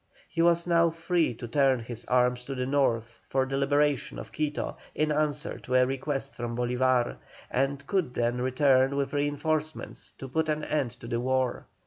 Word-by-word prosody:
He 165 - -1
was 170 0 +4
now 170 -1 +4
free 165 -4 0
to 120 - -7
turn 135 +1 +3
his 115 0 -6
arms 125 0 +2
to 135 - -4
the 125 0 -1
north 120 -5 0
for 135 0 +2
the 135 +1 -3
liberation 145 0 +1
of - - -8
Quito 150 -1 -2 0.2
in 155 0 +1
answer 150 0 0
to 125 - -3
a 125 0 +6
request 135 +1 -3
from 120 -1 -4
Bolívar, 125 0 +1 0.3
and 140 +2 0
could 170 -6 -1
then 120 +1 0
return 130 +1 +3
with 140 0 -1
reinforcements 150 +2 -2
to 135 - -7
put 160 +4 0
an 155 0 0
end 145 -5 0
to 115 - -8
the 120 0 -1
war. 130 0 0
135 Hz, 180 wpm, -28 LUFS, 125-150 Hz, 0.3 s, a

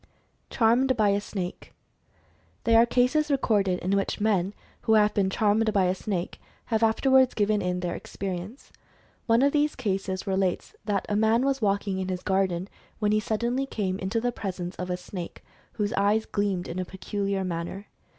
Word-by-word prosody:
CHARMED 245 +2 +3
BY 210 -2 +4
A 200 0 +1
SNAKE. 185 -3 -6 0.9
There 230 0 +6
are 235 - +3
cases 255 +6 +2
recorded 205 -9 +2
in 185 - -1
which 200 +2 -1
men 205 -2 +1 0.3
who 220 - +2
have 210 -1 +4
been 195 -2 +1
"charmed" 215 +2 +2
by 195 -3 +3
a 180 0 +2
snake, 190 -2 -4 0.3
have 220 - +2
afterwards 260 +3 +4
given 210 0 +2
in 180 0 -1
their 175 -1 -2
experience. 195 +6 -6 0.6
One 230 +2 +4
of 280 - +4
these 300 0 +2
cases 195 -4 -2
relates 190 - -1
that 200 -3 0
the 205 - -1
man 220 +4 +3
was 275 -1 0
walking 200 -2 0
in 185 - -2
his 180 -1 -3
garden 190 -2 0 0.3
when 210 -1 +1
he 215 - +3
suddenly 235 +5 -1
came 195 -6 -2
into 190 +5 -1
the 245 +2 0
presence 185 -5 -5
of 180 0 -4
a 180 - -1
snake 180 -1 -8 0.3
whose 210 0 -1
eyes 210 +1 +2
gleamed 200 -3 -1
in 175 - -4
a - - 0
peculiar 195 +1 -3
manner. 175 +3 -4
205 Hz, 180 wpm, -26 LUFS, 190-225 Hz, 0.9 s, There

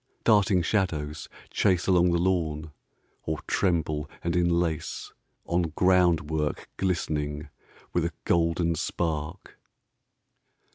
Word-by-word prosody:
Darting 100 -5 +4
shadows 80 -6 -1 0.2
chaseAlong 90 -2 +3
the 85 - +2
lawn, 80 -4 0 0.5
or 80 0 -3
tremble 75 -5 0
and 85 - 0
enlaceOn 85 -1 -2
groundwork 85 -5 +2
glistening 75 -5 -2 0.4
with 85 -1 +1
a 85 - -2
golden 85 0 +2
spark. 80 +1 -3
85 Hz, 85 wpm, -27 LUFS, 80-90 Hz, 0.5 s, Darting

